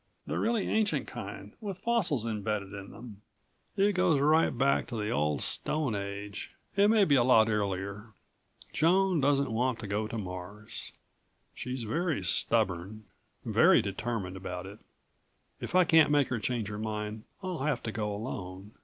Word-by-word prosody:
"The - - -2
really 225 -3 +1
ancient 215 -1 +1
kind - - -8
with 200 -4 -5
fossils 185 - +1
embedded 105 -2 -2
in 100 0 -8
them. 110 -4 -11 0.6
It 200 +1 +4
goes 180 -5 +3
right 155 +3 +4
back 135 +3 +1
to 120 - -6
the 105 0 -2
Old 75 0 0
Stone 150 -6 -1
Age, 100 0 -5 0.2
and 200 +2 +5
maybe 200 -9 +4
a 130 -4 +5
lot 115 -3 +5
earlier. 100 0 -2 0.7
Joan 180 +2 +3
doesn't 140 -2 +2
want 120 +1 0
to 115 - -7
go 105 +2 -1
to 115 - -5
Mars. 95 +2 -7 0.6
She's 125 0 -5
very 155 - -1
stubborn, 90 +4 +1 0.4
very - - +5
determined 100 -2 -3
about 90 -1 -6
it. 100 +3 -10 0.8
If - - -5
I 185 - +7
can't 160 -3 +5
make 145 -2 +3
her 125 - -1
change 115 -1 -2
her 105 0 -5
mind 105 0 -4 0.2
I'll 185 -3 -3
have 135 -2 -1
to 110 - -3
go 105 -1 -2
alone. 100 -3 -6
115 Hz, 160 wpm, -30 LUFS, 100-150 Hz, 0.8 s, I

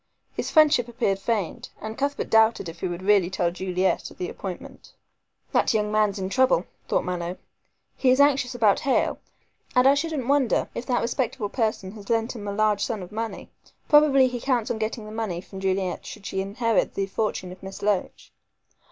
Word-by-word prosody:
His - - -3
friendship 300 -7 +5
appeared 230 -5 -1
feigned, 205 -4 -2
and 220 +1 -6
Cuthbert 280 +2 -2
doubted 220 -3 +4
if 165 +1 -8
he - - -2
would 175 +1 -5
really 195 -3 +4
tell 175 -2 0
Juliet 185 +1 -1
of - - -16
the 180 - -3
appointment. 185 -3 -8 0.6
"That - - +2
young 210 -1 +1
man's 215 -2 +2
in 190 -1 -2
trouble," 255 -6 +3 0.2
thought - - +1
Mallow, 180 0 -3 0.6
"he 260 - +2
is 255 +2 +4
anxious 275 -3 +3
about 215 -4 +3
Hale, 270 - +1 0.6
and 250 +1 +6
I 275 - +7
shouldn't 285 -3 -2
wonder 280 -3 +2
if 240 - -6
that 245 -2 +1
respectable 235 -2 -2
person 215 -5 -1
had 205 -1 -12
lent 230 +1 0
him 205 -3 -7
a - - -2
large 210 0 +1
sum 220 -6 -3
of 180 - -11
money. 225 +1 -5 0.4
Probably 290 -3 +6
he 245 -1 -4
counts 245 -4 0
on 220 - -3
getting 220 0 -3
the 215 - -9
money 215 -6 -3
from 190 +1 -10
Juliet, 190 -1 -1
should 210 -2 -10
she 190 - -2
inherit 225 +4 0
the 195 - 0
fortune 195 -2 -2
of 185 - -12
Miss 195 +1 -9
Loach. 205 -2 -1
215 Hz, 195 wpm, -25 LUFS, 190-245 Hz, 0.6 s, I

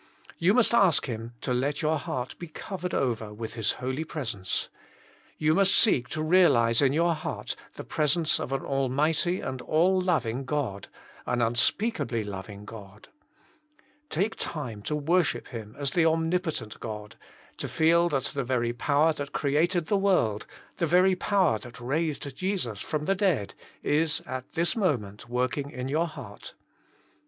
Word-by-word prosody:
You 185 +5 +4
must 245 -2 +4
ask 195 -9 +4
Him 115 -1 -5
to 125 - -1
let 140 +5 -1
your 155 0 +2
heart 125 -1 -4
be 175 - -6
covered 180 +3 -5
over 115 -4 -1
with 110 +1 -6
his 110 -2 +1
holy 130 +4 -3
presence. 120 - -3 0.7
You 155 0 +3
must 195 +3 +4
seek 130 - +4
to 155 - -3
realize 150 -10 +5
in 135 -2 +4
your 170 +3 +2
heart 155 - -4 0.2
the - - -7
pres 150 +1 +1
ence 165 -2 +1
of - - -4
an 135 0 -1
Almighty 150 +7 +1
and 130 -1 -4
all 185 +4 +3
loving 135 -9 0
God, 130 -8 -3 0.4
an 125 - 0
unspeakably 120 - +1
loving 100 0 -7
God. 105 -1 -11 1.0
Take 200 +7 0
time 125 -9 -4
to 150 - 0
worship 165 +3 +1
Him 110 -4 -8
as 140 -1 -1
the 170 +1 +3
om 160 0 +2
nipotent 175 - -2
God, 105 -2 -7 0.4
to - - -3
feel 170 +2 +3
that 135 -5 0
the 140 0 -2
very 120 -2 0
power 145 +6 +2
that 145 -2 -6
created 160 +4 +1
the 205 - +1
world, 180 - +1 0.3
the 170 - +1
very 180 +3 +5
power 180 - +2
that 120 +3 -10
raised 140 +1 -2
Jesus 180 - -2
from 150 -1 -3
the 195 - +3
dead, 185 - 0 0.3
is 155 +1 +2
at 130 0 -6
this 170 0 0
moment 120 - -1
working 130 +3 -1
in 125 -1 -5
your 160 +4 +1
heart. 155 - -10
145 Hz, 165 wpm, -27 LUFS, 120-170 Hz, 1.0 s, realize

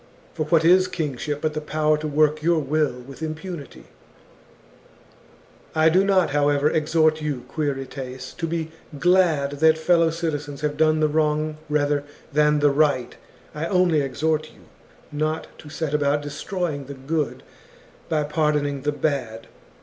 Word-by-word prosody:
* - - -29
For 155 - -2
what 160 0 +3
is 185 +2 +6
kingship, 145 -3 -3
but 155 -1 -1
the 155 - -3
power 155 0 +1
to 155 - -3
work 150 +1 +2
your 170 +1 +2
will 150 -3 0
with 135 +4 -12
impunity? 160 -1 -6 0.9
" - - -28
I 160 0 +5
do 185 +4 +4
not, 190 -6 +3
however, 145 0 +2
exhort 155 0 +2
you, 140 -5 -3
Quirites, 135 -3 -4
to 165 - -2
be 160 -1 -3 0.3
glad 160 -5 +2
that 160 0 +5
fellow 165 0 +3
citizens 150 -4 -4
have 150 -1 -1
done 155 0 +3
the 155 - +4
wrong 155 0 0
rather 145 -1 +1 0.3
than 150 0 +3
the 145 -1 +5
right. 140 -4 +1 0.4
I 155 +2 -3
only 180 -5 +3
exhort 155 +3 -1
you, - - -20 0.5
not 155 +2 -1
to 150 - -11
set 155 -1 -3
about 145 0 +1
destroy 175 +4 -3
ing 140 -1 -6
the 140 +1 -8
good 150 +3 -3 0.7
by 155 -2 +1
pardoning 150 -2 0
the 145 +2 0
bad. 135 -6 -2
150 Hz, 155 wpm, -23 LUFS, 145-160 Hz, 0.9 s, is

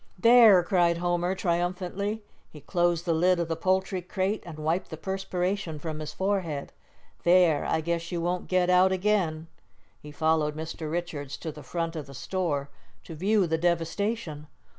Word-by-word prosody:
"There!" 225 -3 +7
cried 175 -2 +2
Homer, 175 +1 0
triumphantly. 185 +4 -2 0.3
He 150 - -12
closed 175 +2 0
the 170 - +1
lid 180 +2 +3
of 170 - -1
the 165 - -1
poultry 190 +2 0
crate, 190 +3 -2
and 160 -3 -8
wiped 160 +4 -1
the - - -7
perspiration 190 -3 -2
from 155 0 -5
his 155 -1 -5
forehead. 185 -6 -2 0.5
"There! 175 -4 +4
I 160 - 0
guess 170 +1 -2
you 175 - -2
won't 175 +2 -2
get 185 -1 +2
out 185 +1 +5
again." 185 -5 0 0.5
He 150 - -11
followed 155 0 +1
Mr. 160 0 -5
Richards 160 -5 -4
to 160 - -5
the 150 - -11
front 165 +4 -3
of 150 -3 -5
the 135 - -11
store 145 -3 -2 0.3
to - - -9
view 195 +5 +2
the 160 -1 -1
devastation. 170 -1 -1
175 Hz, 165 wpm, -27 LUFS, 160-185 Hz, 0.5 s, There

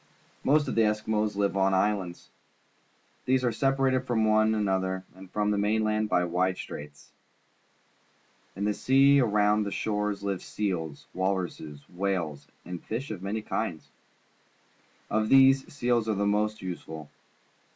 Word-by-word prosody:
Most 150 +1 +3
of - - -2
the 115 - +3
Eskimos 105 -1 0
live 100 -1 0
on 95 0 +2
islands. 95 -3 -1 0.9
These 130 0 +2
are 120 - +2
separated 135 +1 +1
from 110 -3 +1
one 110 0 +3
another 95 -2 -1
and 95 0 -13
from 105 +2 0
the 105 - 0
mainland 110 +1 +1
by 90 - +2
wide 90 +2 0
straits. 75 0 -9 1.4
In 100 +2 -2
the 105 - +1
sea 135 +4 +4
around 105 -3 +3
their 100 -1 -2
shores 105 -1 -2
live 100 -2 -2
seals, 85 -8 -3
walruses, 90 -6 -3
whales, 90 -6 -3 0.2
and 90 0 -7
fish 115 +3 -4
of 100 -4 -6
many 105 +3 -3
kinds. 85 -8 -3 1.2
Of 110 0 +1
these, 135 0 +5
seals 120 -5 0
are 110 - +1
the 100 +1 0
most 105 0 0
useful. 80 -4 -7
105 Hz, 140 wpm, -28 LUFS, 95-110 Hz, 1.4 s, these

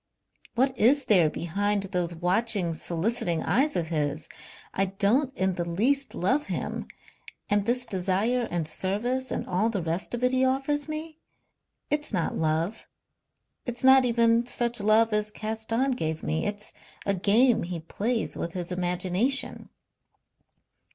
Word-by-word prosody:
What 260 +2 +2
is 270 +4 +4
there 175 -7 +5
behind 200 +6 -1
those 180 -3 -2
watching, 185 +1 +2
soliciting 170 +2 -1
eyes 280 +5 +2
of 165 -3 -1
his? 155 -1 -2 0.5
I 195 - +2
don't 210 +8 +1
in 190 0 +1
the 175 -1 -3
least 270 +11 +1
love 265 +12 0
him, - - -4 0.6
and 205 0 +2
this 250 +1 +1
desire 210 +4 0
and 170 -3 -2
service 240 +10 -2
and - - -3
all 190 +5 +1
the 200 -6 -2
rest 170 +8 -2
of 240 - -6
it 250 - +3
he 260 0 +2
offers 275 +3 0
me 310 +1 -6 0.7
it's 295 0 +1
not 180 -6 -1
love. 160 +7 -1 0.8
It's 245 +1 -3
not 265 0 +7
even 235 -1 +3
such 240 -2 -1
love 215 +2 +3
as 210 0 +1
Caston 225 +5 -2
gave 160 -9 -3
me. 160 +5 -1
It's 205 0 -4 0.3
a 200 - +2
game 215 +6 +3
he 175 0 -4
plays 220 +8 -2
with 170 - -4
his 180 -1 -4
imagination." 180 +8 +1
210 Hz, 145 wpm, -27 LUFS, 180-250 Hz, 0.8 s, not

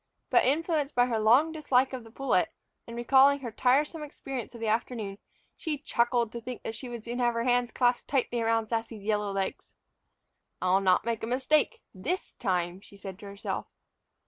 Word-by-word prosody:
But, - - +5
influenced 300 +1 +1
by 245 0 +5
her 235 -3 0
long 245 +9 +5
dislike 270 -5 +2
of 255 -2 -5
the 225 - -13
pullet, 270 +4 +1 0.4
and 235 - -7
recalling 270 +3 +5
her 240 -3 -5
tiresome 285 +8 +2
experience 270 -5 -6
of - - -9
the 225 - -3
afternoon, 215 -2 -2 0.4
she 315 -3 -2
chuckled 240 -4 +1
to 235 - -6
think 250 +1 -7
that 225 - -4
she 250 +2 -7
would 235 -2 -7
soon 240 +2 -4
have 240 -1 +2
her 230 - 0
hands 245 0 +2
clasped 245 -1 +1
tightly 245 -3 +1
about 225 -1 +1
Sassy's 225 -2 -3
yellow 210 -1 0
legs. 195 -1 -4 0.8
"I'll 185 +1 +3
not 185 +1 +3
make 230 -2 -1
a 225 - -3
mistake 265 +5 +1
this 315 - -3
time," 180 -1 -1
she 200 - -16
said 195 -1 -8
to 205 - -9
herself. 200 0 -4
240 Hz, 190 wpm, -29 LUFS, 215-265 Hz, 0.8 s, But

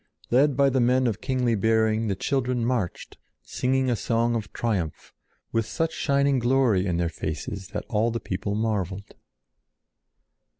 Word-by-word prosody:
Led 135 +2 +4
by 140 -1 +4
the 130 - +1
men 125 +2 +3
of 110 -4 -1
kingly 130 -2 0
bearing 110 +1 +2
the 100 - 0
children 125 0 -1
marched, 115 -8 -3 0.2
singing 130 - 0
a 125 - +2
song 115 +1 0
of 110 -3 -3
triumph, 95 -10 -3 0.4
with 115 -1 0
such 165 +4 -1
shining 140 -2 +2
glory 120 -6 +2
in 85 -2 0
their 85 0 +1
faces 85 +4 -5
that - - -5
all 110 +2 +1
the 115 0 -2
people 100 0 -3
marveled. 100 -3 -2
115 Hz, 155 wpm, -25 LUFS, 100-130 Hz, 0.4 s, Led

